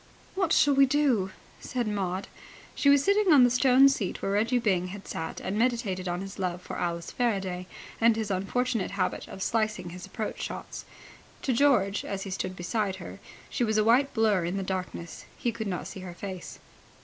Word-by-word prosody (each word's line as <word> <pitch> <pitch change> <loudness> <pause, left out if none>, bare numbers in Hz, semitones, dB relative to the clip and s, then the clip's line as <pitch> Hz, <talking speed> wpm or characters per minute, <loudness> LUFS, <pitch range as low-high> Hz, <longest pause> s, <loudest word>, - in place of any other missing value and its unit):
"What 380 -4 0
shall 290 -3 +5
we 275 0 +6
do?" 260 -9 +2 0.3
said 245 -3 -3
Maud. 195 -2 -2 0.5
She 280 - +2
was 280 -1 +6
sitting 400 0 +3
on 280 -4 +8
the 245 - +5
stone 260 +2 +6
seat 240 -9 -1
where 195 - -2
Reggie 225 +5 +2
Byng 190 -6 +1
had 195 +1 -9
sat 160 0 -5
and 200 +3 -3
meditated 225 -7 0
on 175 +1 -2
his 195 +1 -8
love 180 -2 -1
for - - -7
Alice 170 -1 -3
Faraday 190 -7 -1 0.3
and 230 0 +5
his 220 -2 -2
unfortunate 225 +4 0
habit 185 - -1
of 190 - -6
slicing 215 -5 -1
his 180 +1 -8
approach 220 -2 -5
shots. - - -6 0.6
To 260 - +1
George, 230 -7 +3
as 195 -1 -4
he 195 - -6
stood 185 0 -3
beside 195 +2 -1
her, 190 - -9 0.3
she 245 - -1
was 220 -2 +1
a 215 - +4
white 250 +5 +4
blur 215 -5 +3
in 175 +3 -2
the 195 - -2
darkness. 185 -2 -5
He 240 - 0
could 220 -1 -5
not 180 -3 -3
see - - -7
her 180 -2 -8
face. 185 -2 -7
210 Hz, 195 wpm, -28 LUFS, 185-245 Hz, 0.6 s, on